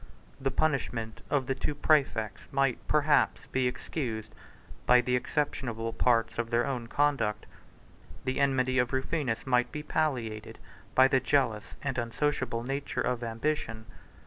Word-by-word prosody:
7 -, -, -15 dB
The -, -, +4 dB
punishment 125 Hz, -7 st, -1 dB
of 140 Hz, -3 st, +1 dB
the 135 Hz, -, 0 dB
two 145 Hz, +2 st, -2 dB
præfects 135 Hz, -9 st, +1 dB
might, 135 Hz, -2 st, +2 dB
perhaps, 150 Hz, 0 st, +3 dB
be 130 Hz, -1 st, +2 dB
excused 125 Hz, -3 st, -4 dB, 0.5 s
by 125 Hz, 0 st, +7 dB
the 125 Hz, +1 st, +1 dB
exceptionable 120 Hz, -4 st, -2 dB
parts 115 Hz, -2 st, +2 dB
of 115 Hz, -1 st, -1 dB
their 120 Hz, +1 st, +2 dB
own 125 Hz, -4 st, -3 dB
conduct; 115 Hz, -7 st, +1 dB, 0.8 s
the 130 Hz, +1 st, -1 dB
enmity 130 Hz, -2 st, +2 dB
of 125 Hz, +1 st, +1 dB
Rufinus 130 Hz, -3 st, -1 dB
might 125 Hz, -2 st, +2 dB
be 150 Hz, -, -5 dB
palliated 115 Hz, -9 st, -2 dB, 0.4 s
by 130 Hz, 0 st, +7 dB
the 135 Hz, 0 st, +3 dB
jealous 130 Hz, -6 st, 0 dB
and 140 Hz, -3 st, -1 dB
unsociable 120 Hz, 0 st, -1 dB
nature 135 Hz, +3 st, -2 dB
of 125 Hz, -1 st, -1 dB
ambition. 115 Hz, -1 st, -2 dB
130 Hz, 145 wpm, -29 LUFS, 115-140 Hz, 0.8 s, by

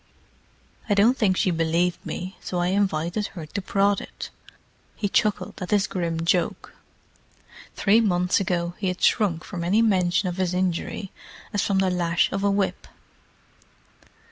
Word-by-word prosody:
I 205 Hz, -, +3 dB
don't 220 Hz, +6 st, +5 dB
think 195 Hz, -7 st, +2 dB
she 185 Hz, -, +2 dB
believed 170 Hz, +1 st, 0 dB
me, 185 Hz, +2 st, -5 dB
so 180 Hz, -, -4 dB
I 175 Hz, 0 st, +1 dB
invited 190 Hz, 0 st, 0 dB
her 165 Hz, -3 st, -6 dB
to 200 Hz, +6 st, -5 dB
prod 200 Hz, +1 st, +1 dB
it!" -, -, -9 dB, 0.6 s
He 205 Hz, -, -1 dB
chuckled 210 Hz, 0 st, 0 dB
at 180 Hz, -, -4 dB
his 205 Hz, -2 st, +3 dB
grim 165 Hz, -2 st, -2 dB
joke. 170 Hz, 0 st, 0 dB, 1.0 s
Three 215 Hz, +3 st, +4 dB
months 180 Hz, -4 st, +2 dB
ago 175 Hz, -3 st, -1 dB
he 200 Hz, -, -1 dB
had 180 Hz, 0 st, -3 dB
shrunk 175 Hz, -7 st, +2 dB
from 175 Hz, -4 st, -5 dB
any 205 Hz, +6 st, +3 dB
mention 185 Hz, -3 st, +2 dB
of 180 Hz, 0 st, -3 dB
his 185 Hz, -1 st, 0 dB
injury 185 Hz, +1 st, -2 dB, 0.4 s
as 205 Hz, -, +1 dB
from 195 Hz, -, +1 dB
the 190 Hz, -1 st, +2 dB
lash 175 Hz, -1 st, +1 dB
of 195 Hz, 0 st, -2 dB
a 200 Hz, -, +3 dB
whip. 200 Hz, 0 st, -1 dB
185 Hz, 160 wpm, -24 LUFS, 175-200 Hz, 1.0 s, don't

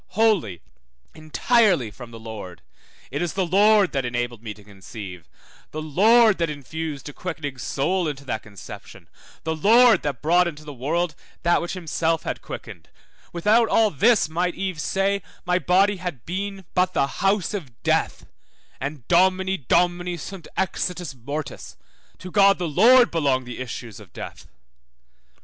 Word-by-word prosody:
wholly, 195 Hz, -, +2 dB, 0.5 s
entirely 170 Hz, -, +2 dB
from 120 Hz, +3 st, -11 dB
the 115 Hz, -1 st, -11 dB
Lord; 105 Hz, -6 st, -9 dB, 0.5 s
it 145 Hz, -, -2 dB
is 175 Hz, -2 st, -2 dB
the 190 Hz, -1 st, 0 dB
Lord 205 Hz, +2 st, +4 dB
that 135 Hz, -3 st, -1 dB
enabled 120 Hz, -2 st, -3 dB
me 110 Hz, -2 st, -6 dB
to 105 Hz, -, -17 dB
conceive, 95 Hz, -3 st, -10 dB, 0.4 s
the 155 Hz, -, -6 dB
Lord 215 Hz, +7 st, +5 dB
that 165 Hz, -1 st, +1 dB
infused 150 Hz, 0 st, -6 dB
a 145 Hz, -, -8 dB
quickening 145 Hz, -7 st, -5 dB
soul 175 Hz, +8 st, -1 dB
into 140 Hz, -2 st, -5 dB
that 110 Hz, -, -3 dB
conception, 100 Hz, -3 st, -12 dB, 0.4 s
the 160 Hz, 0 st, -2 dB
Lord 225 Hz, +5 st, +6 dB
that 140 Hz, -3 st, -4 dB
brought 175 Hz, +3 st, +4 dB
into 155 Hz, -2 st, -7 dB
the 145 Hz, -, -7 dB
world 155 Hz, +6 st, -1 dB, 0.3 s
that 175 Hz, 0 st, +3 dB
which 170 Hz, -, -4 dB
himself 165 Hz, -2 st, -1 dB
had -, -, -4 dB
quickened; -, -, -9 dB, 0.4 s
without 215 Hz, +7 st, +3 dB
all 220 Hz, -2 st, +3 dB
this 205 Hz, -, +3 dB
might 175 Hz, +2 st, -1 dB
Eve 185 Hz, -4 st, -3 dB
say, 195 Hz, +3 st, 0 dB, 0.2 s
my 180 Hz, 0 st, +2 dB
body 195 Hz, +3 st, +3 dB
had 175 Hz, -10 st, -6 dB
been 195 Hz, +2 st, -4 dB
but 180 Hz, 0 st, +1 dB
the 140 Hz, -, +3 dB, 0.2 s
house 195 Hz, 0 st, +1 dB
of 140 Hz, -, -7 dB
death, -, -, 0 dB, 0.5 s
and 140 Hz, -2 st, -6 dB
Domini 190 Hz, +2 st, +3 dB
Domini 175 Hz, +3 st, +1 dB
sunt 185 Hz, +1 st, -8 dB
exitus 180 Hz, -3 st, -2 dB
mortis, 140 Hz, +4 st, -7 dB, 0.4 s
To 185 Hz, -, -9 dB
God 200 Hz, 0 st, +5 dB
the 175 Hz, -, -2 dB
Lord 235 Hz, -, +6 dB
belong 140 Hz, -6 st, +1 dB
the 125 Hz, 0 st, -8 dB
issues 120 Hz, -4 st, -7 dB
of -, -, -16 dB
death. -, -, -9 dB
170 Hz, 155 wpm, -23 LUFS, 135-190 Hz, 0.5 s, Lord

